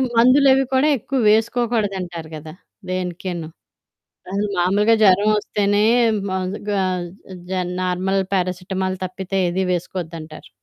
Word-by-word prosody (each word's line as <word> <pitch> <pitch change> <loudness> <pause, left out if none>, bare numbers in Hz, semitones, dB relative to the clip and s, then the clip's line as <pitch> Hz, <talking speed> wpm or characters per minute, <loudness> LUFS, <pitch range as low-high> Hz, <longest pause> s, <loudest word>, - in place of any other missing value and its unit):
మందులవి 265 +3 +5
కూడా 265 +3 +3
ఎక్కువ 265 +3 -3
వేసుకోకూడదంటారు 210 -8 -1
కదా! 155 +1 -9 0.4
దేనికీను. 180 -2 -4 0.8
అది 200 +1 0
మామూలుగా 205 +5 +3
జ్వరవొస్తేనే 205 +1 +3 0.4
మగా 190 +2 -2 0.7
జ - - -1 0.3
నార్మల్ 185 +2 0
పారాసిటమాల్ 185 0 -1
తప్పితే 190 +1 -4
ఏది 190 +2 -1
వేసుకోవద్దంటారు. 165 -3 -6
190 Hz, 90 wpm, -21 LUFS, 180-210 Hz, 0.8 s, మందులవి